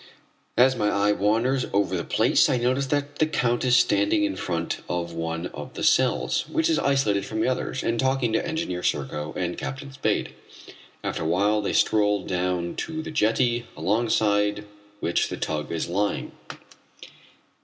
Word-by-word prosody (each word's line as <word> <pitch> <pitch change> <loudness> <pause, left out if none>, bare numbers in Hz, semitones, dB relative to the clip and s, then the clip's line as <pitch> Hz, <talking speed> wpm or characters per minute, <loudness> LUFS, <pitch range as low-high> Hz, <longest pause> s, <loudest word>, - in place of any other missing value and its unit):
As 130 +2 +5
my 105 -3 +1
eye 100 0 +2
wanders 115 +6 +1
over 100 -2 +1
the 85 - -2
place - - +3
I 130 - +2
notice 130 +3 0
that 145 +1 -2
the 155 - +3
Count 120 -6 0
is 125 -1 +4
standing 310 - +3
in 305 0 0
front 85 -2 -3
of 85 -1 -2
one 85 +1 -3
of - - -8
the - - -5
cells, - - +2
which 160 0 +1
is 160 - +2
isolated 135 -8 +1
from 110 +2 -4
the - - +1
others, 130 +1 -2
and 115 0 0
talking 130 -3 +1
to - - +1
Engineer 160 - -3
Serko 75 -2 -2
and 85 -1 -2
Captain 140 +1 -6
Spade. - - -1 0.7
After - - -3
a 80 - -1
while 100 +5 +2
they 100 - -2
stroll 105 -2 +2
down 90 -1 -2
to 160 0 -4
the - - -6
jetty 120 -2 +1
alongside 105 -1 +1 0.4
which 85 - +1
the - - -5
tug 75 -2 -3
is 85 0 -2
lying. 100 +4 -1
110 Hz, 170 wpm, -25 LUFS, 90-130 Hz, 0.7 s, As